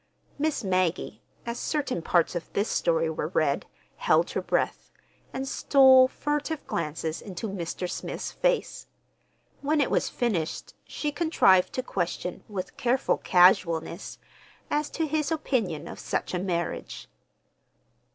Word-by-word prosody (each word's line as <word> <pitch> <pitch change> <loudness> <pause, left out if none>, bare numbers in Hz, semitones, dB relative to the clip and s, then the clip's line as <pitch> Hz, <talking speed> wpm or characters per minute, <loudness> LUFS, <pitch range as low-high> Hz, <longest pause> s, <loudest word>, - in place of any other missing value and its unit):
Miss 300 -4 0
Maggie, 185 -3 0 0.2
as 235 0 -4
certain 285 - -1
parts 170 0 +2
of 175 -2 -5
this 205 +2 +1
story 165 -1 +1
were 160 -1 -2
read, 155 -4 0 0.3
held - - +2
her - - -1
breath, - - -1 0.4
and 265 0 -4
stole 265 -2 +6
furtive 295 +3 -3
glances 160 - -3
into 200 +2 -6
Mr. 180 -2 -4
Smith's - - -5
face. - - -1 0.7
When 300 +2 +1
it 285 - +1
was - - +1
finished 185 -10 -2
she 295 - -3
contrived 285 - +4
to 255 - -2
question 180 -3 -3
with 190 -3 -5
careful 255 +2 +1
casualness, 175 -1 +3 0.5
as 295 0 0
to 325 - -1
his 305 -1 -1
opinion 220 - -1
of - - -8
such - - -3
a 180 - 0
marriage. 175 -2 -3
200 Hz, 130 wpm, -27 LUFS, 170-280 Hz, 0.7 s, stole